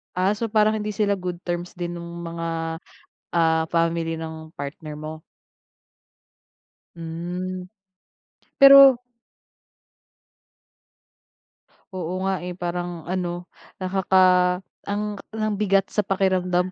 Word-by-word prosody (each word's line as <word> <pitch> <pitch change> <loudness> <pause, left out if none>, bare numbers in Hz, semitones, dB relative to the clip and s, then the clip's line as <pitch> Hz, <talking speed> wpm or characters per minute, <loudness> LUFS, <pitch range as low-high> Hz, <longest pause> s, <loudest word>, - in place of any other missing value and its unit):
Ah, 185 +2 +2
so 230 - -2
parang 215 0 +3
hindi 210 0 -3
sila 200 -1 +1
good 180 -1 -5
terms 175 0 -4
din 175 -1 -4
nung 170 0 -8
mga, 165 -1 -3 0.6
ah, 160 -1 +3
family 165 -1 +1
ng 160 0 -8
partner 150 +2 -7
mo? 155 +1 -7 1.7
Hmm. 175 +3 -5 0.9
Pero 275 -2 +9 2.9
Oo 180 0 -3
nga 190 -2 -1
eh, 180 - -4
parang 175 -2 -4
ano, 175 -1 -3 0.3
nakaka 185 -1 +3 0.3
ang 210 +1 -2 0.2
ang 215 -1 -1
bigat 195 -2 +2
sa 210 - +1
pakiramdam 185 -2 +1
180 Hz, 100 wpm, -23 LUFS, 170-195 Hz, 2.9 s, Pero